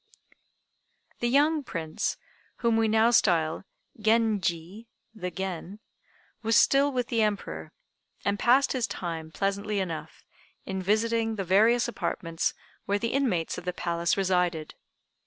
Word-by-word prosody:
The 240 - 0
young 295 +4 +3
Prince, 165 -9 -3 0.4
whom 235 -1 +1
we 225 0 +3
now 220 +2 +4
style 165 -6 +2 0.3
Genji 215 -3 0 0.3
(the 180 -5 -4
Gen), 190 +2 -5 0.6
was 225 0 +3
still 280 +1 +4
with 250 -2 -2
the 230 -2 +1
Emperor, 190 - -2 0.5
and 200 0 0
passed 260 +3 +4
his 255 -3 0
time 165 -3 -5
pleasantly 200 +3 -1
enough 160 -4 -5 0.4
in 190 -1 -3
visiting 225 +3 +1
the 195 - -2
various 220 +7 +4
apartments 165 -7 -2 0.3
where 200 - +1
the 230 +3 -2
inmates 235 -12 0
of - - -13
the 180 - -2
palace 170 0 -1
resided. 180 -4 0
200 Hz, 130 wpm, -27 LUFS, 175-230 Hz, 0.6 s, now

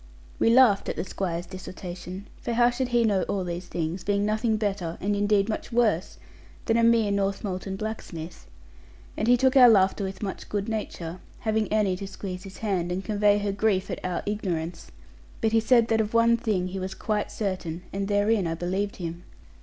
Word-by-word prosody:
We - - +4
laughed 235 -4 +5
at - - -2
the - - -2
Squire's 175 -2 -3
dissertation; 185 +1 -8 0.2
for 235 - -2
how 240 +1 +4
should 255 +1 -1
he 240 -1 +2
know 205 -4 +2
all 195 -2 0
these 175 0 -5
things, 170 +2 -3
being 205 0 +1
nothing 215 +1 +1
better, 195 -6 -2
and 205 +2 0
indeed 205 0 +2
much 220 +2 -4
worse 225 -7 +1 0.5
than 225 - +2
a 230 - +4
mere 230 -3 +4
Northmolton 195 -1 -2
blacksmith? 190 -6 -6 0.7
He 245 +3 +3
took 260 +1 +3
our 250 -2 +9
laughter 200 -1 +4
with 190 +2 -5
much 195 - -5
good 205 -1 -2
nature; 185 -6 -4 0.2
having 220 -1 0
Annie 205 -4 +2
to 195 +1 -6
squeeze 190 -1 -7
his 195 - -10
hand 185 -5 -1
and 185 +2 -3
convey 205 -1 +3
her 205 -1 -1
grief 200 -2 0
at - - -5
our 180 -1 -2
ignorance: 175 -5 -3 0.5
but 220 - +1
he 225 - +4
said 230 +1 +4
that 225 -1 +3
of 215 +1 -3
one 230 0 +5
thing 210 -6 -1
he 190 +1 -4
was 190 +1 -4
quite 210 -1 -2
certain, 185 -4 -3
and 195 0 -2
therein 205 -1 +2
I 165 - -2
believed 190 +4 -2
him. 170 -1 -6
200 Hz, 195 wpm, -26 LUFS, 185-220 Hz, 0.7 s, our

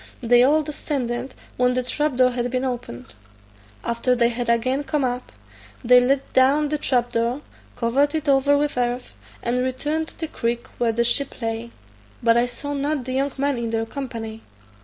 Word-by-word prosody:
They 240 +1 +5
all 300 +5 +4
descended 270 -4 -3 0.2
when 250 0 +2
the 255 - 0
trap 295 +2 -1
door 255 0 +4
had 245 0 -2
been 255 +1 -1
opened. 235 - -5 0.7
After 235 +2 +1
they 235 -1 +3
had 240 0 -3
again 255 +4 +1
come 295 -1 -1
up, 250 0 -2 0.5
they 250 +1 +7
let 265 +2 0
down 280 +3 +4
the 300 0 -1
trap 245 -4 +1
door, 235 +4 0 0.3
covered 270 +6 +1
it 310 -1 -2
over 280 +1 +4
with 290 -3 0
earth, 245 +1 -2 0.3
and 240 +1 0
returned 295 +5 -1
to - - -10
the 325 - -2
creek 235 -4 -2
where 235 -1 +2
the 235 +1 +1
ship 250 +4 0
lay, 225 0 -3 0.5
but 230 0 +5
I 240 +1 +3
saw 285 +4 -5
not 285 -1 -1
the 255 - -3
young 275 +1 0
man 280 -2 0
in 230 -1 -2
their 225 0 -1
company. 225 -4 -6
250 Hz, 185 wpm, -23 LUFS, 235-280 Hz, 0.7 s, they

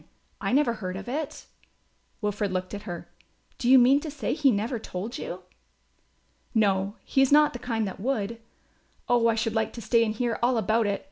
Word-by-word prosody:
I - - -1
never 265 -2 +3
heard 185 -4 -5
of 195 - -8
it." 285 +4 -4 0.8
Wilfred 210 -1 -1
looked 185 +1 -3
at 205 0 -6
her. 175 -1 -6 0.5
"Do 240 - 0
you 265 - +9
mean 260 +3 +6
to 310 - -6
say 290 -2 -2
he 290 -2 +3
never 230 +2 0
told 215 +5 -6
you?" 180 +1 -6 1.1
"No, 200 -2 +2
he 270 - +1
is 270 - +3
not 300 0 +6
the 245 - -6
kind 225 -3 -1
that 190 - -7
would. 230 -1 -2 0.7
Oh, 240 -1 +3
I 230 - +3
should 225 0 -1
like 220 -1 0
to 235 - -7
stay 230 +3 +3
and 215 -1 -1
hear 235 0 -1
all 245 +1 +2
about 220 +1 +2
it! 200 -1 -1
230 Hz, 200 wpm, -26 LUFS, 205-250 Hz, 1.1 s, you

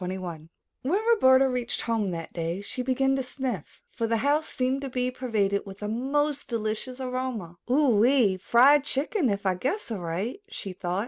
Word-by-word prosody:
A - - -3
NEW 185 0 -4
ARRIVAL 160 -2 -8 0.3
When 380 +12 0
Roberta 260 - +5
reached 250 -2 -2
home 225 -3 0
that 165 -3 -5
day, 170 +2 -2
she 230 +5 -5
began 270 +1 +1
to - - 0
sniff, 255 - -5
for 230 -1 -2
the 230 0 +1
house 300 +2 +2
seemed 260 +2 -1
to 275 - -4
be 250 0 -1
pervaded 215 -6 0
with 195 0 -10
a - - -2
most 280 +6 -1
delicious 230 +3 -3
aroma. 250 -9 -4
"Ohee, 245 -5 +4
fried 270 +7 +6
chicken, 290 - 0
if 200 -1 -2
I 190 - +3
guess 265 - -3
aright!" 195 - -3
she 195 - -7
thought. 180 +1 -2
245 Hz, 185 wpm, -27 LUFS, 200-270 Hz, 0.3 s, fried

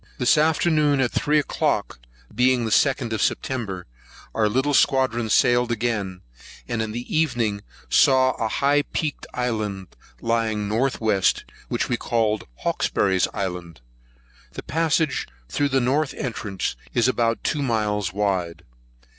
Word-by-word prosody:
This 125 - +4
afternoon, 155 -2 +2
at 125 -3 +1
three 150 +1 +1
o'clock, 145 - -1 0.3
being 125 +1 +2
the 110 - -3
2d 130 -2 +2
of 110 - -1
September, 105 -9 -2 0.5
our 110 -1 +2
little 135 +6 +1
squadron 130 -5 +2
sailed 120 +2 +3
again, 105 -5 -2 0.5
and 120 -2 -2
in 110 -1 -3
the 120 +7 -5
evening 120 -10 0 0.3
saw 130 -1 +4
a 115 - -2
high 140 +6 +2
peaked 150 0 -4
island 105 -7 -3 0.2
lying 115 -2 0
north 120 +6 0
west, 110 -4 +1 0.2
which - - -1
we 120 - 0
called 110 -4 0 0.2
Hawkesbury's 95 -2 +1
Island. 90 -6 -5 0.7
The - - -7
passage 160 -2 0 0.2
through 145 - 0
the 135 0 +2
north 135 +4 0
entrance 105 -6 -3 0.2
is 120 0 +3
about 115 -2 0
two 150 - 0
miles 105 -7 0
wide. 95 -4 -2
120 Hz, 135 wpm, -23 LUFS, 105-135 Hz, 0.7 s, This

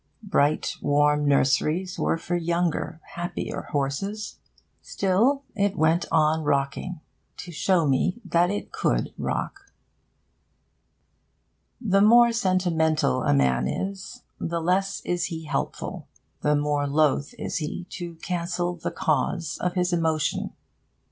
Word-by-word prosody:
Bright 155 -7 +1
warm 145 0 +3
nurseries 150 +7 +2
were - - +1
for 175 +1 -3
younger, 170 -1 -1
happier 175 0 -4
horses. 150 +10 -2 0.4
Still 225 +9 +1
it 200 -2 0
went 160 +2 +2
on 155 0 +3
rocking, 145 +4 -1 0.4
to 175 - -8
show 170 +1 +2
me 145 - +1
that 175 0 +2
it 205 +1 -4
could - - 0
rock. - - -4 2.1
The 195 -2 +2
more 235 +3 +7
sentimental 170 - +1
a - - +2
man 65 -2 +2
is, 195 - -5 0.2
the 170 0 -2
less 190 +4 0
is 175 0 0
he 160 -2 -5
helpful; 150 - -4 0.3
the 150 0 +2
more 145 0 0
loth 145 0 +1
is - - -3
he 160 +3 -4
to 175 -2 -6
cancel 175 +1 -2
the 175 - -4
cause 155 +2 -1
of 180 +1 -1
his 180 0 +1
emotion. 160 -3 0
170 Hz, 120 wpm, -25 LUFS, 150-185 Hz, 2.1 s, more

